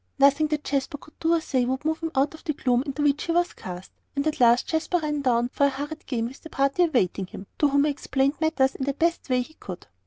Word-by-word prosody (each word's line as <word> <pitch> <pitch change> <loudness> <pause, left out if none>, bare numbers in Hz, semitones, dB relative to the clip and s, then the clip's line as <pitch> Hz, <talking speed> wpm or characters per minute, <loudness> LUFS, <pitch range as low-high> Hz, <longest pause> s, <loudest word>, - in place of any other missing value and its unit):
Nothing 280 +3 +5
that 300 -1 -2
Jasper 280 +1 -1
could 305 - -19
do 330 +1 +3
or - - +2
say 260 -5 0
would 260 +3 -2
move 315 0 0
him 330 - -2
out 275 +3 +2
of 315 - -13
the 310 - -1
gloom 250 -3 +1
into 285 +2 -2
which 290 0 +2
he 335 - -1
was 350 +1 +1
cast, 180 0 -8 0.2
and 280 +1 0
at 310 - -1
last 240 0 +5
Jasper 320 +2 0
ran 300 -3 -2
down 240 -2 +2
for 280 +2 +2
a - - +2
hurried 290 +3 -6
game 230 -4 -1
with 255 +4 -8
the 320 - -10
party 275 +6 +2
awaiting 195 - 0
him, 190 - -9
to 295 - +5
whom 280 0 +3
he 300 - +2
explained 275 +1 -1
matters 290 -4 +2
in 265 - -4
the 275 -1 -1
best 335 -1 0
way 250 -1 +3
he 315 - -16
could. 185 - -9
280 Hz, 270 wpm, -25 LUFS, 260-310 Hz, 0.2 s, Nothing